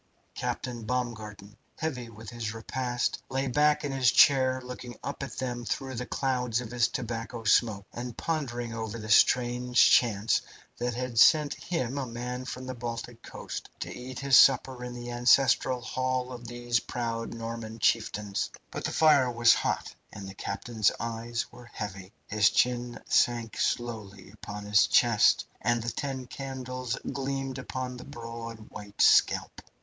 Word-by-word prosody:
Captain 120 -2 -4
Baumgarten, 110 -4 -4 0.2
heavy 130 -7 -3
with 110 0 -10
his 115 -2 -4
repast, 120 +1 -2
lay 135 +1 -1
back 150 +4 +3
in 145 - -2
his 130 -2 +3
chair 130 -2 +5
looking 125 -1 -8
up 140 - -5
at 140 - -6
them 120 -2 -3
through 130 +4 -3
the 125 0 -4
clouds 125 -3 0
of 120 -2 -7
his 120 -1 +2
tobacco 115 -1 -5
smoke, 105 -2 +3
and 120 -1 -6
pondering 120 -8 -3
over 110 0 -4
the 110 -1 -5
strange 125 +2 +4
chance 110 -2 +3 0.4
which 120 -1 -1
had 125 -2 -2
sent 150 +2 +6
him, 140 -6 -3
a 135 - -3
man 125 +2 -5
from 125 0 -6
the 130 - -4
Baltic 120 -1 -6
coast, - - -7
to - - -5
eat 125 +1 -8
his 140 -2 +6
supper 130 -1 +4
in 125 0 -6
the 120 0 -6
ancestral 125 +1 +3
hall 130 +1 -2
of 120 -2 -8
these 120 0 0
proud 115 -1 -4
Norman 115 -1 -6
chieftains. 105 -3 0 0.2
But - - -5
the - - -1
fire 145 -5 +5
was 120 -1 +5
hot, - - -2 0.2
and 95 - -8
the 95 - -8
captain's 110 +1 0
eyes 115 0 -3
were 120 -1 -14
heavy. 95 -2 -6
His 105 0 +3
chin 120 -1 0
sank 120 -2 +2
slowly 105 -5 -3
upon 105 -1 -8
his 105 0 +4
chest, - - +4 0.2
and 120 -1 +1
the 115 - -2
ten 135 -3 -4
candles 130 -1 -5 0.2
gleamed 135 -1 -3
upon 130 -1 -5
the 125 - -9
broad, 115 -4 -8
white 105 -1 -10
scalp. - - +4
120 Hz, 160 wpm, -28 LUFS, 115-130 Hz, 0.4 s, sent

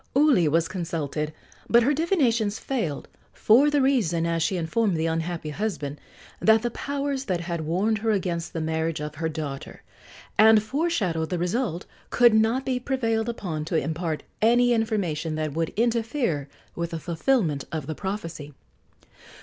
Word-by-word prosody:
Uli 275 - +5
was 165 +2 +2
consulted, 160 -4 -3 0.4
but 235 0 +6
her 280 +5 +3
divinations 250 - +1
failed, 195 - -3 0.3
for 255 +7 +5
the 290 -2 +2
reason, 195 - +2
as 165 0 0
she 180 +3 +1
informed 185 +3 0
the 160 - 0
unhappy 165 -1 -2
husband, 150 -6 -4 0.4
that 220 +1 +4
the 240 - -1
powers 280 +1 -3
that 180 -3 -1
had 170 -1 -3
warned 190 +8 0
her 225 +2 -1
against 175 -5 -1
the 165 - -4
marriage 160 0 -1
of 150 0 -5
her 160 +2 -2
daughter 150 -3 -6 0.6
and 220 0 +7
foreshadowed 215 - -1
the 180 - -1
result 180 +1 -1 0.2
could 240 -2 +5
not 225 +4 +2
be 255 -2 0
prevailed 230 -3 -1
upon 170 -9 -4
to 165 +2 -3
impart 160 +1 -2 0.2
any 240 +2 +4
information 180 -9 -1
that 155 -2 -2
would 165 +1 -1
interfere 225 - 0 0.3
with 170 0 -3
the 165 -1 -4
fulfilment 165 - 0
of 155 -4 -3
the 155 - -3
prophecy. 165 -6 -6
180 Hz, 160 wpm, -25 LUFS, 160-235 Hz, 0.6 s, and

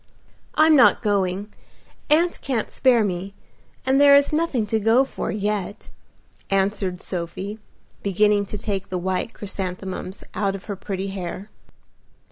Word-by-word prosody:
"I'm 310 0 +6
not 250 -3 +5
going. 200 0 0 0.6
Aunt 335 +4 +3
can't 250 -6 -2
spare 245 -4 +3
me, 195 0 -3 0.5
and 265 +2 +3
there 285 -1 +8
is 280 +1 +4
nothing 300 -8 +1
to 220 +1 0
go 225 +5 +4
for - - -5
yet," 205 -1 -3 0.6
answered 195 -2 0
Sophie, 185 +4 -4 0.4
beginning 205 +1 +2
to 210 - -5
take 195 -2 -3
the 185 - -2
white 185 +4 -2
chrysanthemums 190 -1 -5
out 200 -2 -1
of 195 - -9
her 200 - -4
pretty 195 0 -4
hair. 195 +2 -6
205 Hz, 135 wpm, -23 LUFS, 190-230 Hz, 0.6 s, there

